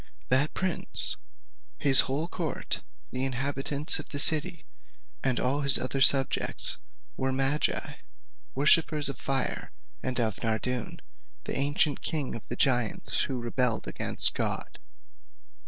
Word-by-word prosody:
That 130 Hz, +4 st, +1 dB
prince, 185 Hz, -2 st, -3 dB, 0.6 s
his 135 Hz, -2 st, +5 dB
whole 145 Hz, +5 st, +1 dB
court, 165 Hz, -5 st, -5 dB, 0.3 s
the 130 Hz, 0 st, -4 dB
inhabitants 135 Hz, +2 st, -1 dB
of -, -, -9 dB
the 145 Hz, -, -5 dB
city, 160 Hz, +3 st, +6 dB, 0.6 s
and 130 Hz, -2 st, 0 dB
all 135 Hz, +3 st, -1 dB
his 140 Hz, -2 st, +7 dB
other 135 Hz, +1 st, -3 dB
subjects, 135 Hz, 0 st, +3 dB, 0.4 s
were 130 Hz, 0 st, -2 dB
magi, 135 Hz, +3 st, -1 dB, 0.6 s
worshippers 150 Hz, +1 st, +2 dB
of 140 Hz, -, -7 dB
fire, 135 Hz, -1 st, -2 dB, 0.3 s
and 130 Hz, -1 st, -3 dB
of 110 Hz, -4 st, -2 dB
Nardoun, 115 Hz, +2 st, -3 dB, 0.4 s
the -, -, -6 dB
ancient 145 Hz, +1 st, 0 dB
king 150 Hz, -5 st, -3 dB
of 115 Hz, -, -11 dB
the 120 Hz, -, -5 dB
giants, 125 Hz, -4 st, 0 dB
who 130 Hz, -, -5 dB
rebelled 120 Hz, 0 st, -1 dB
against -, -, +4 dB
God. -, -, -4 dB
135 Hz, 125 wpm, -27 LUFS, 130-145 Hz, 0.6 s, his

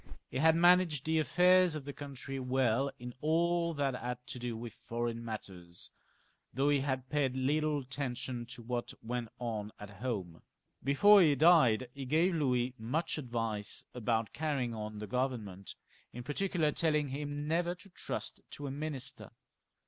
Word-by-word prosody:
He 130 Hz, -, -2 dB
had 160 Hz, +2 st, +5 dB
managed 175 Hz, -4 st, +4 dB
the 160 Hz, 0 st, +2 dB
affairs 180 Hz, +2 st, +5 dB
of 145 Hz, -3 st, -5 dB
the 145 Hz, -, -5 dB
country 135 Hz, -1 st, -6 dB
weU 130 Hz, 0 st, +1 dB
in 125 Hz, 0 st, -7 dB
all 170 Hz, +1 st, +2 dB
that 140 Hz, -2 st, 0 dB
had 125 Hz, -1 st, -3 dB
to 130 Hz, -, -7 dB
do 120 Hz, -2 st, -3 dB
with 115 Hz, -1 st, -7 dB
foreign 115 Hz, -1 st, -2 dB
matters, 90 Hz, -6 st, -7 dB, 0.6 s
though 140 Hz, +2 st, +1 dB
he 145 Hz, -1 st, +4 dB
had 130 Hz, -1 st, -2 dB
paid 140 Hz, -3 st, +1 dB
little 150 Hz, +3 st, +1 dB
atten 130 Hz, -1 st, -3 dB
tion 125 Hz, -1 st, -4 dB
to 120 Hz, 0 st, -9 dB
what 120 Hz, +1 st, -3 dB
went 120 Hz, 0 st, -3 dB
on 110 Hz, -3 st, -3 dB
at 105 Hz, -1 st, -9 dB
home. 95 Hz, -10 st, -3 dB, 0.4 s
Before 200 Hz, +10 st, +7 dB
he 150 Hz, -5 st, +5 dB
died 135 Hz, -7 st, +5 dB
he 140 Hz, -1 st, -6 dB
gave 160 Hz, +7 st, +3 dB
Louis 125 Hz, -5 st, +1 dB
much 145 Hz, +9 st, -1 dB
advice 115 Hz, -5 st, -3 dB
about 115 Hz, -2 st, -1 dB
carry 150 Hz, -3 st, -1 dB
ing 120 Hz, -1 st, -3 dB
on 110 Hz, -1 st, -5 dB
the 105 Hz, -, -5 dB
Government, 110 Hz, -6 st, -3 dB, 0.4 s
in 120 Hz, -, -7 dB
particular, 155 Hz, +2 st, 0 dB
telling 150 Hz, -2 st, +1 dB
him 145 Hz, +1 st, -4 dB
never 170 Hz, +2 st, +1 dB
to 195 Hz, +2 st, -15 dB
trust -, -, -5 dB
to 145 Hz, -, -6 dB
a 135 Hz, -, -3 dB
minister. 140 Hz, -2 st, -5 dB
135 Hz, 165 wpm, -33 LUFS, 120-155 Hz, 0.6 s, Before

